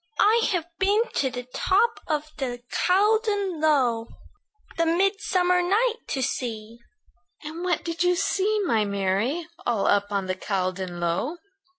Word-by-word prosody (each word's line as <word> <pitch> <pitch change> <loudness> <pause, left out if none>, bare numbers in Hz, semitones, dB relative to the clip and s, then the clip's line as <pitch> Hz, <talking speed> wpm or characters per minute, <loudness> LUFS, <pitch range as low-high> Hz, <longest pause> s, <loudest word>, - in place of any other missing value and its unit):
"I've 420 -5 +3
been 405 +3 +3
to 265 - +2
the 250 -1 -6
top 430 +5 +2
of 305 -1 -1
the 245 -3 -4
Caldon 405 -2 +1
Low, 250 -7 +2 0.7
The 335 0 +1
midsummer 360 0 +2
night 435 +7 +2
to 265 - -1
see." 230 -3 -4 0.6
"And 320 +3 -6
what 360 -1 0
did 335 0 -3
you 360 0 +3
see, 405 +3 +1
my 225 - +2
Mary, 200 - -1 0.2
All 225 -5 0
up 205 0 +2
on 200 -1 -1
the 185 - -1
Caldon 185 -2 -3
Low?" 175 - -1
315 Hz, 135 wpm, -25 LUFS, -, 0.7 s, I've